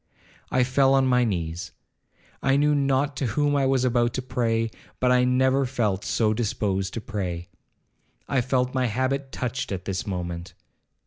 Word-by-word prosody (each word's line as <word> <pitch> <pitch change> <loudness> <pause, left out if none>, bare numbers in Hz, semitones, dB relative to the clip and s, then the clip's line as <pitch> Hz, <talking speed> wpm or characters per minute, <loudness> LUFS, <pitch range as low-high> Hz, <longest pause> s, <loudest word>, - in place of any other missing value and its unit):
I 130 - +3
fell 135 +2 +3
on 135 -1 +4
my 125 -1 +3
knees. 90 -3 -3 0.7
I 135 +1 +3
knew 150 +1 +3
not 140 0 +1
to 135 - 0
whom 145 -1 +2
I 135 -1 +2
was 130 -1 +2
about 120 -1 +1
to 130 - -2
pray, 115 -3 0 0.3
but 125 0 +3
I 125 0 +4
never 130 +2 +3
felt 110 -7 -1
so 110 -2 +1
disposed 100 -4 -1
to 115 - -3
pray. 90 -5 -4 0.8
I 135 - +1
felt 125 0 0
my 130 -1 +1
habit 130 +4 -1
touched 125 -1 -3
at 95 -2 -4
this 95 0 -3
moment. 85 -2 -4
125 Hz, 170 wpm, -25 LUFS, 105-130 Hz, 0.8 s, on